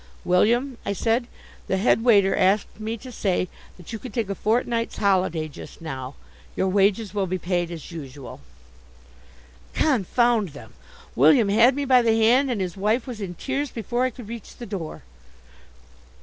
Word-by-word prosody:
"William," 235 +8 +2
I 200 - -2
said, 230 +4 0 0.4
"the 190 - 0
head 225 +3 +2
waiter 200 -5 +5
asked 195 +3 +1
me 220 +2 -3
to 255 +3 -10
say 190 -5 0 0.3
that 180 +4 -11
you 225 - -4
could 250 -2 -9
take 225 -5 -1
a - - 0
fortnight's 230 +2 -1
holiday 185 -5 +1
just 145 - -11
now. 135 -4 -6 0.4
Your 190 - +1
wages 200 +2 +2
will 200 -2 0
be 185 +1 -1
paid 175 -1 -1
as 170 -1 -8
usual." 140 - -9 1.3
Confound 235 - +2
them! 120 -6 -12 0.4
William 160 - +5
had 230 +5 +5
me 285 0 -2
by 255 -2 +5
the 225 -1 +2
hand, 250 +5 +4
and 230 -6 -1
his 180 -2 -3
wife 215 +5 0
was 240 -4 -7
in 180 -3 -5
tears 275 - -2
before 240 +2 -2
I 255 - +2
could 245 -3 -11
reach 230 -2 -9
the 240 - -7
door. 190 - -6
210 Hz, 170 wpm, -24 LUFS, 180-240 Hz, 1.3 s, waiter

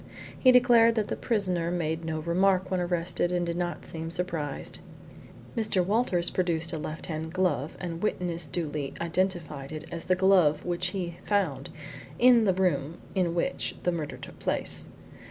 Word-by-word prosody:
He 255 - +5
declared 240 -2 +6
that 215 -2 0
the - - -1
prisoner 185 -7 +1
made 165 -2 -2
no 160 -1 -3
remark 185 +3 +2
when 185 - +1
arrested 175 0 -1
and 175 -1 0
did 170 0 -2
not 175 0 -3
seem 165 0 -5
surprised. 165 -5 -4 0.8
Mr. 215 -6 +1
Walters 195 -4 +1
produced 170 -2 0
a 160 - -2
left 155 +1 -5
hand 160 0 -4
glove 165 -6 0
and 170 -2 -5
witness 175 -5 0
duly 150 -2 -3
identified 170 -5 -2
it 155 0 -5
as 170 -1 -6
the 185 - +3
glove 180 -6 +4
which 175 0 0
he 180 -2 -4
found 170 -10 0 0.5
in 240 -2 +6
the 190 - +3
room 170 -4 0 0.2
in 180 -3 0
which 225 +10 -1
the 180 - +2
murder 160 -4 -4
took - - -11
place. - - -1
175 Hz, 165 wpm, -28 LUFS, 160-190 Hz, 0.8 s, declared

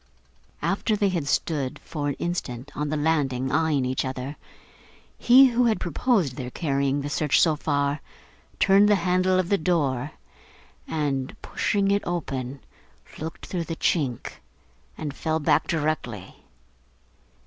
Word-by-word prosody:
After 210 +2 +1
they 205 -1 +2
had 170 -6 -2
stood 140 -2 -1
for 150 -3 -5
an 140 - -2
instant, 145 -6 -4
on 150 0 -2
the 155 - -1
landing, 140 -4 0
eyeing 155 -4 +2
each 130 0 -1
other, 130 +2 -4 0.8
he 260 +2 +7
who 245 0 +2
had 225 -2 +2
proposed 175 - 0
their 125 -3 -4
carrying 140 -1 0
the 140 - -4
search 150 -1 +2
so 160 -3 +4
far, 145 -1 -1 0.6
turned 200 +1 +5
the 205 - +6
handle 185 0 +2
of 185 -1 0
the 200 - +2
door, 145 -5 0 0.7
and, 140 -4 -2
pushing 200 -1 0
it 200 0 +2
open, 135 -6 -4 0.6
looked 160 +1 -6
through 175 -3 -3
the 165 - -4
chink, 140 -8 -1 0.6
and 150 -3 -4
fell 160 +2 -1
back 145 - +2
directly. 150 - -3
155 Hz, 140 wpm, -25 LUFS, 135-180 Hz, 0.8 s, he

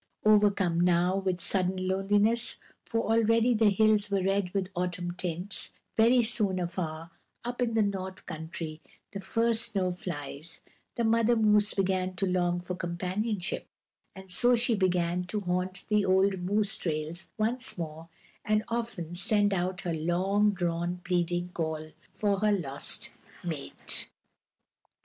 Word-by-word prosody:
Overcome 205 -5 +4
now 180 +1 +3
with 190 -2 -1
sudden 185 0 0
loneliness 205 +5 +2 0.3
for 230 - -1
already 230 +1 +3
the 220 -1 +4
hills 210 0 +3
were 195 -2 +1
red 195 -1 +1
with 190 -1 -1
autumn 175 0 -2
tints; 180 +2 -3 0.2
very 235 +2 +5
soon 210 -5 0
after, 170 -2 -4 0.3
up 245 +1 -4
in 230 -2 +1
the 220 - +4
North 190 -2 -4
Country, 160 -1 -6 0.3
the 200 - -5
first 230 +4 +1
snow 185 -2 +1
flies 160 -3 -6 0.3
the 235 - 0
mother 230 +1 +3
moose 210 -1 +3
began 185 -1 0
to 195 - 0
long 175 -1 +1
for 180 +1 -5
companionship, 180 +3 -2 0.5
and 190 -1 -11
so 245 +7 +4
she 235 +1 +2
began 180 -3 +1
to 205 +4 -3
haunt 180 0 -2
the 210 -1 +3
old 190 0 +3
moose 205 +3 +1
trails 160 +1 -3
once 235 +3 0
more, 165 0 -6 0.3
and 215 -1 +2
often 230 -8 -3
send 205 +2 +2
out 180 0 -1
her 175 - -2
long 185 +6 +2
drawn, 175 -2 -1
pleading 175 0 0
call 160 -2 -3 0.2
for 200 -2 0
her 210 +1 +3
lost 140 -8 -1 0.3
mate. 155 -5 -4
190 Hz, 140 wpm, -29 LUFS, 175-210 Hz, 0.5 s, very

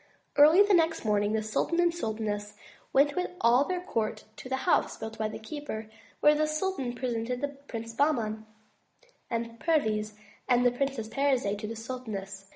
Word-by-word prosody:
Early 310 +7 +8
the 410 0 +2
next 330 -5 +2
morning, 205 0 +2
the 220 0 0
sultan 220 +10 0
and 345 -1 +3
sultaness 210 -7 -3 0.4
went 285 +2 +4
with 360 - -1
all 245 +4 +4
their 365 +1 -2
court 220 -10 -2
to 255 - -9
the 265 - +1
house - - +2
built 220 0 -7
by 215 - +1
the 215 - -6
keeper, 220 -4 -6 0.3
where 300 - +7
the 305 +1 +1
sultan 310 -6 -2
presented 245 0 -2
the 285 +1 -1
Princes 235 -5 -8
Bahman 225 -6 0 0.8
and 230 -1 -3
Perviz, 215 -10 +1 0.4
and 245 0 +4
the 245 - +5
Princess 255 -3 -2
Parizade 250 -6 +1
to 215 - -5
the 225 - -5
sultaness. 215 -5 -6
240 Hz, 170 wpm, -29 LUFS, 220-290 Hz, 0.8 s, Early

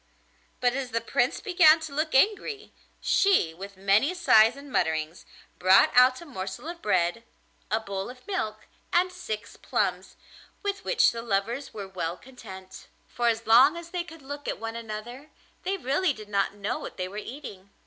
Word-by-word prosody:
But 245 -1 +2
as 265 -1 -3
the 230 -1 0
Prince 245 +2 0
began 345 -5 +6
to 315 -3 -7
look 310 +1 -1
angry, 415 - +1 0.3
she, 380 - +3
with 195 +3 -10
many 205 - +2
sighs 225 -9 +5
and 280 0 -12
mutterings, 160 -2 -1 0.3
brought 185 +2 +6
out 255 +1 +6
a - - -10
morsel 195 - -6
of 340 0 -7
bread, 185 +2 +1 0.5
a 220 - +1
bowl 200 -2 -5
of 250 0 -13
milk, 215 - -3 0.3
and 360 +1 +2
six 355 -13 -6
plums, - - -2 0.5
with 400 -1 -2
which 460 - +3
the 230 - -5
lovers 230 +5 -2
were 200 -3 -7
well 180 -2 -4
content: 190 -8 -12 0.2
for 240 0 -1
as 230 0 0
long 255 +9 +6
as 340 0 -9
they 355 -1 -2
could 325 -3 -13
look 285 +2 -7
at - - -2
one 225 0 -5
another 230 +5 -7 0.3
they 390 +1 -2
really 300 +2 +1
did 215 -4 -11
not 200 0 0
know 205 0 -3
what - - -8
they 185 -1 -2
were 200 +3 -9
eating. 210 -5 -8
235 Hz, 180 wpm, -27 LUFS, 200-310 Hz, 0.5 s, began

